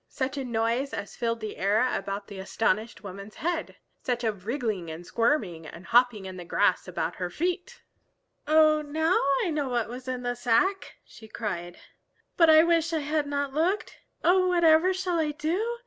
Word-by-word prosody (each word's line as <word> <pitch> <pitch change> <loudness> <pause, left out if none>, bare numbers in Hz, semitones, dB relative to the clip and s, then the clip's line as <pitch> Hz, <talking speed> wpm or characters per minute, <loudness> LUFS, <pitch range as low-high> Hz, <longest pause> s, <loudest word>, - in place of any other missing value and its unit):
Such 260 +1 -3
a 275 - -3
noise 235 +3 -1
as 200 - -6
filled 230 -1 -2
the 215 -1 -6
air 210 +6 +2
about 200 +1 -4
the 200 -2 -9
astonished 215 +3 -1
woman's 200 +1 -9
head! 335 0 -3 0.3
Such 245 -1 -2
a 225 - +2
wriggling 210 - -3
and 160 +2 -8
squirming 210 - 0
and 170 +4 -11
hopping 240 -4 +3
in 185 -1 -7
the 180 - -7
grass 185 +2 +1
about 180 - -3
her 180 -1 -3
feet! 360 - -3 0.6
"Oh, 310 0 +5
now 315 +4 +1 0.3
I 345 - -1
know 295 -3 -1
what 240 -3 -1
was 250 +2 -8
in 255 -1 -3
the 245 0 -1
sack!" 245 +12 +1
she 220 - -14
cried. 175 -6 -5 0.6
"But 330 -2 +5
I 315 0 +8
wish 335 -1 +2
I 320 - 0
had 300 0 -1
not 285 -1 -2
looked. 365 +8 -1 0.2
Oh, 365 +2 +4
whatever 340 0 +4
shall 370 -2 -1
I 305 -2 0
do? 380 +11 -2
255 Hz, 180 wpm, -27 LUFS, 210-315 Hz, 0.6 s, I